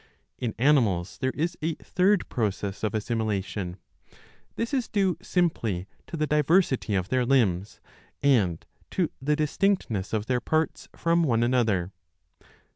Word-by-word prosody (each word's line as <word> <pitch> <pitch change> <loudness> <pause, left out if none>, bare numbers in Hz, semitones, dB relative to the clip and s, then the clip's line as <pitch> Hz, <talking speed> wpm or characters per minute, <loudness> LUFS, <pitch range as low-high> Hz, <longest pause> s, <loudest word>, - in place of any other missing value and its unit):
In 120 -4 -2
animals 115 -10 +2
there 130 -1 +1
is 170 +3 -1
a 160 0 -1
third 195 +1 +1
process 100 -3 -2
of 110 0 0
assimilation; 105 -4 -2 0.8
this 230 +4 -3
is 255 -4 0
due 195 -4 +1
simply 120 - 0 0.2
to 165 - -5
the 155 - +1
diversity 150 - +2
of 95 +1 -1
their 130 0 +2
limbs 110 -7 +1 0.4
and 105 - +2 0.2
to 180 -4 0
the 150 +3 +2
distinctness 150 - 0
of 110 -1 -1
their 125 0 0
parts 160 +3 -1
from 170 0 +2
one 120 -7 +2
another. 110 -7 +1
125 Hz, 135 wpm, -26 LUFS, 105-160 Hz, 0.8 s, animals